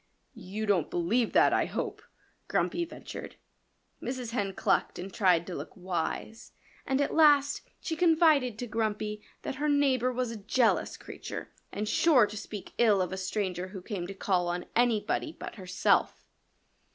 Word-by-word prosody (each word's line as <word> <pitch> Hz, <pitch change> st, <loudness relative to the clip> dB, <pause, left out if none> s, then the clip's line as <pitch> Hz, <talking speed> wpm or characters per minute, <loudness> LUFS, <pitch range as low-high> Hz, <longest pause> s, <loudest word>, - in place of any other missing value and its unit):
"You 215 Hz, -1 st, -5 dB
don't 190 Hz, -7 st, +2 dB
believe 210 Hz, +7 st, +1 dB
that, -, -, +5 dB
I -, -, +3 dB
hope," -, -, -4 dB, 0.5 s
Grumpy 345 Hz, 0 st, 0 dB
ventured. 335 Hz, -, -9 dB, 0.7 s
Mrs. 250 Hz, -2 st, -4 dB
Hen 205 Hz, -5 st, -1 dB
clucked -, -, +1 dB
and 185 Hz, +1 st, -7 dB
tried 180 Hz, -5 st, +3 dB
to 185 Hz, -, -6 dB
look -, -, -7 dB
wise. 185 Hz, +5 st, -4 dB, 0.3 s
And 270 Hz, -1 st, +1 dB
at 285 Hz, -, 0 dB
last 290 Hz, -2 st, +5 dB, 0.2 s
she 320 Hz, -, -3 dB
confided 315 Hz, -8 st, +4 dB
to 245 Hz, -, -4 dB
Grumpy 215 Hz, -2 st, -2 dB, 0.2 s
that 265 Hz, -, -4 dB
her 300 Hz, -, +2 dB
neighbor 265 Hz, -4 st, +3 dB
was 250 Hz, -1 st, -2 dB
a 230 Hz, -, -6 dB
jealous 225 Hz, +4 st, +1 dB
creature -, -, -8 dB, 0.2 s
and 210 Hz, +1 st, -3 dB
sure 255 Hz, +1 st, +5 dB
to 210 Hz, -, -8 dB
speak 205 Hz, -1 st, -7 dB
ill 215 Hz, -4 st, +5 dB
of 185 Hz, 0 st, -1 dB
a -, -, -1 dB
stranger 185 Hz, -1 st, -2 dB
who 190 Hz, 0 st, -8 dB
came 180 Hz, -4 st, -4 dB
to 195 Hz, -, -7 dB
call 185 Hz, -2 st, +1 dB
on 175 Hz, +1 st, -2 dB
anybody 240 Hz, +6 st, +1 dB
but -, -, -6 dB
herself. 185 Hz, -3 st, +1 dB
215 Hz, 165 wpm, -29 LUFS, 190-255 Hz, 0.7 s, that